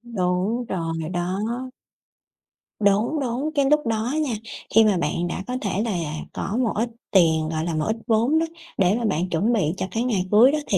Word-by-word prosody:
Đúng 185 +6 0
rồi 165 -5 -3
đó. 180 +2 -1 1.4
Đúng, 215 +9 +2
đúng, 265 +3 -1
cái 280 -1 +3
lúc 300 -3 +3
đó 225 +2 0
nha, 260 -7 -1 0.4
khi 225 - +8
mà 210 -3 +3
bạn 170 +2 -1
đã 185 - -4
có 250 0 -2
thể 200 -1 -1
là 175 -9 -2 0.2
có 205 - -3
một 225 - 0
ít 230 +3 0 0.2
tiền, 160 -4 +4
gọi 160 0 -2
là, 170 -2 -2
một 155 - 0
ít 220 - 0
vốn 235 +7 +3
đó 325 - +1 0.3
để 190 +1 +3
mà 240 - -2
bạn 180 -2 0
chuẩn 195 +8 +1
bị 180 -8 +1
cho - - -1
cái 230 - -1
ngày 210 -7 0
cưới 230 +6 +7
đó 305 - 0
thì 195 - +2
205 Hz, 205 wpm, -23 LUFS, 175-235 Hz, 1.4 s, khi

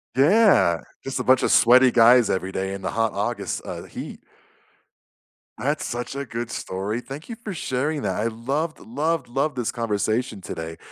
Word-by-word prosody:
Yeah, 155 - +4 0.2
just 135 -1 -3
a - - -1
bunch 130 0 +4
of - - +2
sweaty 125 +1 +6
guys 120 0 +6
every 95 0 -1
day 95 +1 -3
in 100 - -6
the - - -3
hot 115 0 0
August, 100 -1 -2
uh, - - -6
heat. - - -8 1.4
That's 145 +4 -1
such 120 +2 -4
a 140 0 -3
good 120 0 -5
story. 100 +5 -3
Thank 135 +5 -9
you 230 - -6
for 205 - -4
sharing 145 0 -2
that. 95 -2 -1
I 110 +2 0
loved, 135 +8 -3
loved, 145 +3 -2
loved 135 +2 -1
this 120 - -1
conversation 110 0 -1
today. 80 -3 -6
120 Hz, 175 wpm, -23 LUFS, 105-140 Hz, 1.4 s, sweaty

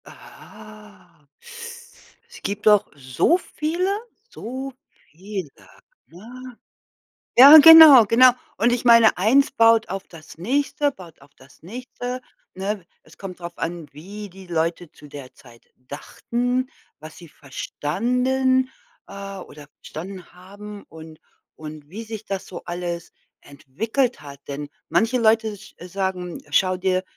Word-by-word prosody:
Ah. 205 -7 -16 1.0
Es - - -14
gibt 205 +1 -5
doch 210 -1 +5
so 130 - +1
viele, 345 +2 -3 0.4
so 260 - -7 0.4
viele, 185 0 -7 0.6
ne? 240 +7 -13 0.8
Ja, 280 +5 +11
genau, 315 -5 +10
genau. 250 +4 +6 0.3
Und 235 +4 +2
ich 245 - -2
meine, 230 -2 +6
eins 265 +10 +3
baut 230 -3 +3
auf 195 +1 -6
das 160 -2 -14
nächste, 280 - -1
baut 175 - -15
auf 140 +1 -20
das 135 +2 -21
nächste, 245 +5 -7 0.3
ne? 195 0 -4 0.2
Es 155 0 -21
kommt 185 -2 -9
drauf 170 0 -9
an, 165 -1 -5
wie 205 +7 -10
die 190 +1 -14
Leute 170 0 -3
zu 150 - -16
der 140 -3 -11
Zeit 120 -2 -19
dachten, 245 - -4 0.3
was 155 +1 -12
sie 170 - -14
verstanden, 250 - -1 0.4
äh, 195 0 -8
oder 150 -5 -12
verstanden 185 +3 -10
haben 200 +3 -12
und 160 -1 -13 0.4
und 150 -1 -11
wie 215 +8 -8
sich 220 -1 -8
das 195 -1 -5
so 175 - -9
alles 175 -1 -6 0.3
entwickelt 225 - -3
hat. 140 -1 -12
Denn 145 +1 -6 0.2
manche 230 +3 +1
Leute 220 -2 +1
sch - - -16
sagen: 180 -1 -4
„Schau 185 +5 +2
dir 185 0 -1
195 Hz, 130 wpm, -22 LUFS, 165-240 Hz, 1.0 s, Ja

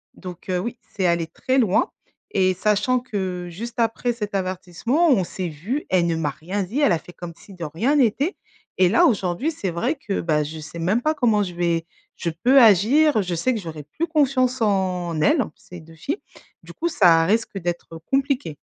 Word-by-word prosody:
Donc, 180 0 -10
heu, 180 - +1
oui, 235 +5 -4 0.2
c'est 190 -2 0
allé 170 -1 +1
très 260 +10 -1
loin 205 -6 +2 0.4
et 185 -1 +2
sachant 210 +6 +1
que 185 -6 -4
juste 235 +7 -7
après 235 +1 0
cet 210 -3 -5
avertissement, 190 - 0
on 195 -7 +3
s'est 180 -1 -4
vues, 200 - -4
elle 175 -2 +2
ne 165 - 0
m'a 150 -3 -1
rien 190 +7 -4
dit, 225 +11 -3
elle 250 - +4
a - - +2
fait 175 - -14
comme 175 -1 -8
si 200 - -15
de 175 -3 -6
rien 220 - 0
n'était 275 - +2 0.4
et 185 -1 +5
là, 230 - +5
aujourd'hui, 200 - 0
c'est 195 - -4
vrai 240 - -1
que, 220 -8 -3
bah 150 -3 +1
je 155 +2 -7
sais 160 +2 -9
même 195 +8 +1
pas 310 +3 +1
comment 225 -6 +2
je 180 -2 -5
vais 170 -1 0 0.3
je 170 - -2
peux 250 +12 +4
agir. 225 - +5
Je 180 -1 -3
sais 255 +10 +1
que - - -2
j'aurai 160 -3 -7
plus 305 - -3
confiance 260 -5 +1
en 185 -5 0
elles, 280 - +4
ces 180 -1 -12
2 165 +1 -16
filles. 290 - -4 0.4
Du - - -12
coup, 340 - -2
ça 170 - +5
risque 215 0 0
d'être 170 -1 -5
compliqué. 270 - 0
195 Hz, 205 wpm, -22 LUFS, 170-245 Hz, 0.4 s, et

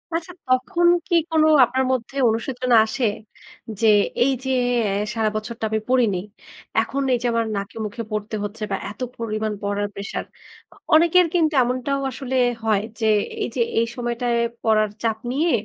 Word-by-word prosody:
আচ্ছা 340 +2 -4
তখন 260 +8 +2 0.2
কি 345 - +1
কোন 320 -1 +3 0.2
আপনার 260 +2 -1
মধ্যে 255 +1 -3
অনুশোচনা 245 +2 0
আসে? 235 +3 -2 0.7
যে 225 - +3 0.4
এইযে 265 0 -1 0.4
এ - - -1 0.2
সারা 220 -1 +1
বছরটা 220 +1 -4
আমি 220 0 0
পড়িনি। 240 -7 +3 0.6
এখন 275 - -3
এইযে 245 0 0
আমার 230 0 +1
নাকে 200 +2 -5
মুখে 215 +3 -5
পড়তে 215 +1 -3
হচ্ছে 210 +2 -5
বা - - +1
এতো 210 +5 -7
পরিমাণ 215 -1 -2
পড়ার 205 0 -1
প্রেশার। 200 +1 -5 0.5
অ - - -22 0.2
অনেকের 340 +3 +5
কিন্তু 320 -3 +2
এমনটাও 255 +3 -1
আসলে 265 +1 -5 0.3
হয় 215 -3 +2 0.2
যে, 225 - -1 0.4
এইযে - - -2 0.2
এই 230 - +2
সময়টায় 240 0 -1 0.3
পড়ার 215 -1 +3
চাপ 225 -1 0
নিয়ে 315 +6 +1
235 Hz, 155 wpm, -22 LUFS, 220-265 Hz, 0.7 s, অনেকের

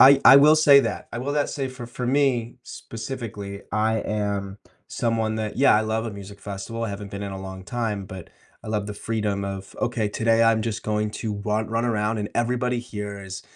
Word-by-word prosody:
I 135 +1 +9
I 135 - +11
will 150 +3 +7
say 145 -3 +8
that, - - -3
I - - -3
will 140 +4 -2
that 145 -1 +1
say 135 -2 -2
for 130 -2 -8
for 125 +1 -5
me, 125 -3 +1
specifically, 110 -6 -7
I 110 +1 +2
am 100 -2 -2 0.3
someone 115 -2 0
that 110 -1 -3
yeah, 140 - +6
I 105 - +4
love 110 +1 -1
a - - -3
music 100 0 -10
festival. 100 +4 -5
I 110 - -3
haven't 100 0 -6
been 100 0 -5
in 100 -1 -4
a 95 - -6
long 95 0 -8
time, 105 -1 -2
but 95 -3 -9 0.4
I - - -7
love 105 -2 -1
the 105 - -5
freedom 105 -2 -2
of, 95 0 -6
"Okay, 115 -3 0
today 115 +2 +2
I'm 115 -1 +4
just 110 -1 -3
going 105 0 0
to 110 -1 -3
run 105 +1 -1
run 115 +1 0
around 110 -1 0
and 105 0 -2
everybody 125 +1 0
here 105 -4 -6
is 95 0 -7
110 Hz, 215 wpm, -24 LUFS, 100-120 Hz, 0.4 s, I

